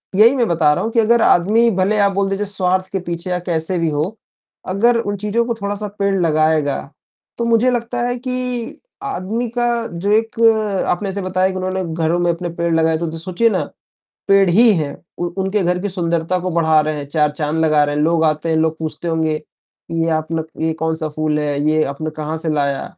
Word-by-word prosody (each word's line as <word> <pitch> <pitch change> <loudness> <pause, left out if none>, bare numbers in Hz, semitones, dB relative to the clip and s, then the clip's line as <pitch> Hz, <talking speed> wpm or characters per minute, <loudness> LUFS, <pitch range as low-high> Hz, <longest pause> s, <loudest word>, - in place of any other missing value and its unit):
यही 230 +6 +6
मैं 240 -3 +1
बता 160 -4 +3
रहा - - -2
हूँ 225 - -2
कि 230 - +2
अगर 230 +1 +4
आदमी 220 +7 +4
भले 190 +3 +1
आप 200 0 +4
बोल 195 0 0
दीजिए 200 +1 -1
स्वार्थ 185 -1 0
के 195 - -1
पीछे 175 +1 -5
या 180 0 0
कैसे 170 0 -1
भी 165 -1 +1
हो, 155 +9 -2 0.5
अगर 230 +6 +3
उन 205 -3 -2
चीज़ों 210 +4 0
को 235 - -1
थोड़ा-सा 205 +1 -3
पेड़ 200 0 +1
लगाएगा, 155 -4 +1 0.6
तो 235 - -1
मुझे 235 +2 +3
लगता 240 0 -2
है 245 0 -2
कि 250 -2 -4 0.2
आदमी 220 +7 -3
का 240 - +2 0.3
जो 190 +4 -2
एक 225 0 -3 0.5
आपने 195 +3 -1
ऐसे 200 +1 -3
बताया 185 0 +1
कि 190 - -5
उन्होंने 185 0 -2 0.2
घरों 165 +2 +1
में 175 -1 +2
अपने 175 +1 -4
पेड़ 170 0 -2
लगाए 160 0 +2
तो 170 +1 -3
द 165 - -6
सोचिए 185 +7 +1
ना, - - 0 0.7
पेड़ 195 -1 +5
ही 225 +5 +6
हैं, 150 -3 -3 0.2
उ 175 - -1 0.2
उनके 195 +1 0
घर 180 +1 +1
की 205 - -1
सुंदरता 170 -1 -1
को 185 +1 -3
बढ़ा 160 -2 +3
रहे 155 0 -1
हैं, 145 - -4
चार 150 0 +2
चाँद 150 +1 -3
लगा 155 -2 +4
रहे 145 - -1
हैं, 150 - +1
लोग 165 +1 +2
आते 155 +1 0
हैं, 160 - +1
लोग 160 0 +1
पूछते 160 +2 -4
होंगे 160 -1 0 0.6
ये 165 0 0
अपना 160 +1 -1 0.2
ये 160 0 +1
कौन-सा 160 0 -2
फूल 155 -1 0
है? 145 -1 -1
ये 155 0 +3
आपने 150 +3 -4
कहाँ 155 +1 -3
से 160 0 -4
लाया? 140 -2 0
175 Hz, 215 wpm, -18 LUFS, 160-205 Hz, 0.7 s, यही